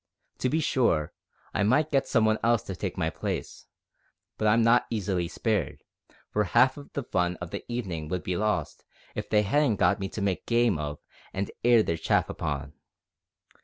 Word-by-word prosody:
To 130 - +1
be 155 - +1
sure, 115 - +1 0.4
I - - 0
might 135 +9 +3
get 135 -1 +2
some 115 -3 +3
one 110 0 +2
else 120 -1 +3
to 95 - -6
take - - -4
my - - 0
place, - - -5 0.7
but 110 - 0
I'm 115 +2 +4
not 115 +2 +4
easily 95 -5 -1
spared, 105 +2 -2 0.5
for 105 - +2
half 130 +7 +4 0.2
the 140 - -2
fun 90 -5 0
o' 90 - -4
the 85 - -6
evenin' 90 -10 -3
would 90 +2 -3
be 90 - -2
lost 105 +2 -1 0.3
if - - -5
they 105 -1 +4
hadn't 135 +2 +2
got 100 +1 +2
me 95 0 -3
to - - -6
make 95 -2 -1
game 115 -7 +2
of 75 -1 -4 0.4
and 100 +1 -3
air 120 -2 +6
their 85 - -1
chaff 80 - +1
upon. 70 -1 -4
105 Hz, 185 wpm, -27 LUFS, 90-120 Hz, 0.7 s, air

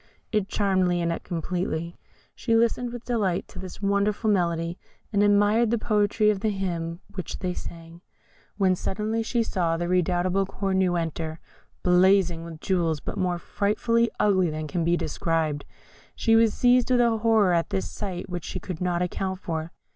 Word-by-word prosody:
It 210 -3 +1
charmed 190 -3 +2
Lionette 170 -1 -1
completely. 170 -1 -3 0.4
She 230 -2 0
listened 235 +1 +2
with 240 0 -8
delight 205 -7 0
to - - -10
this 190 +2 -9
wonderful 200 +2 +1
melody, 170 -2 0 0.3
and 200 - +3
admired 205 +3 +4
the 235 - +2
poetry 215 0 +2
of 205 - -2
the 215 +2 0
hymn 175 -4 -3
which 185 - -5
they 180 -1 -2
sang; 165 0 -9 0.6
when 190 -2 +3
suddenly 215 +5 -2
she 230 +1 0
saw 170 -6 0
the 175 +1 -2
redoubtable 180 +2 +1
Cornue 190 -3 0
enter, 160 -1 -4 0.4
blazing 180 -1 +4
with 165 -2 -9
jewels, 170 -5 0
but - - -6
more 180 -3 0
frightfully 230 +6 +1
ugly 190 -4 +3
than 155 0 -4
can 165 +3 -2
be 170 +1 +2
described. 155 -2 -1 0.5
She 225 -1 +3
was 225 -1 +4
seized 245 0 +4
with 250 -1 +4
a 230 -2 +3
horror 215 -4 +3
at 170 -1 +1
this 95 0 -2
sight 190 - -5
which 175 -3 -5
she 185 - -4
could 180 -1 -7
not 180 -1 0
account 190 +1 -3
for. 165 -3 -4
185 Hz, 170 wpm, -25 LUFS, 170-210 Hz, 0.6 s, admired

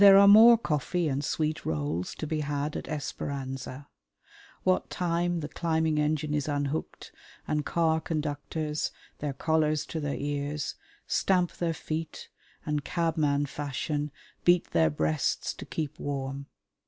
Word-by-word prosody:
There 195 -1 +10
are 200 0 +8
more 225 +3 +9
coffee 170 - 0
and 140 0 -1
sweet 155 0 -1
rolls 80 +3 -2
to - - -4
be 155 0 -1
had 145 0 -2
at - - -4
Esperanza, 140 -2 -4 0.8
what 185 0 +2
time 175 -1 0
the 150 - -3
climbing 160 -1 0
engine 150 0 0
is 145 -1 0
unhooked 145 +1 -3 0.4
and 150 -1 0
car 160 -1 +2
conductors 150 0 -2 0.3
their 145 -2 -2
collars 155 +1 +1
to 160 - -4
their 145 -2 -2
ears 145 +1 -2 0.3
stamp 180 -2 +2
their 165 -2 -2
feet 160 0 -5 0.4
and, 150 -1 -1
cabman 155 -4 +1
fashion, 145 +1 -3 0.3
beat 175 0 +4
their 80 -1 +4
breasts 80 +1 0
to - - -9
keep 155 -3 -4
warm. 140 0 -4
150 Hz, 140 wpm, -29 LUFS, 140-160 Hz, 0.8 s, There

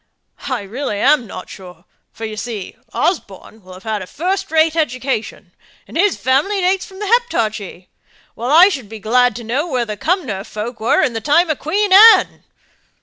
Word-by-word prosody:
I 255 -4 -2
really 220 +2 -4
am 270 -1 +3
not 185 - -9
sure; 180 -2 -13 0.3
for 225 - -7
you 215 -1 -6
see 215 -3 -6 0.2
Osborne 220 - -3
will 185 0 -13
have 185 - -14
had 220 -2 -3
a 185 - -8
first 380 - -3
rate 320 0 +2
education, 260 -6 -3 0.4
and - - -13
his 380 +2 +2
family 290 +11 +1
dates 375 +2 0
from 380 -2 -14
the 415 - -5
Heptarchy, 220 - -1 0.5
while 240 +2 -5
I 340 +7 +7
should 265 - -6
be 220 - -8
glad 245 +2 +2
to 240 - -7
know 260 +9 -2
where 255 -6 -1
the 210 -2 -6
Cumnor 265 - -2
folk 220 +3 -7
were 225 +4 +2
in 260 -5 0
the 225 - -4
time 315 - +2
of 300 - -3
Queen 390 +6 0
Anne?" 440 +3 +7
255 Hz, 190 wpm, -17 LUFS, 215-345 Hz, 0.5 s, I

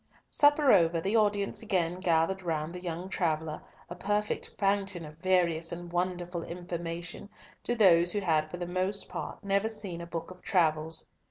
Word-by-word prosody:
Supper 290 -2 +5
over, 170 -3 +4
the 195 +6 -1
audience 205 -2 +1
again 180 -5 0
gathered 180 +1 +1
round 160 -2 -2
the 180 - -7
young 175 0 -4
traveller, 160 -4 -1 0.3
a - - -7
perfect 210 +3 -1
fountain 195 -3 0
of 150 +1 -12
various 170 -3 +2
and 175 0 -7
wonderful 175 -1 -2
information 175 +1 -6 0.3
to 240 - -1
those 175 -5 +6
who 205 - 0
had 160 -5 +1
for 175 - -6
the 175 - -4
most 185 +3 0
part - - -6
never 200 +2 +1
seen 200 -6 -5
a 170 - -7
book 170 +1 -5
of 180 0 -13
travels. 160 -3 +1
175 Hz, 170 wpm, -30 LUFS, 165-195 Hz, 0.3 s, those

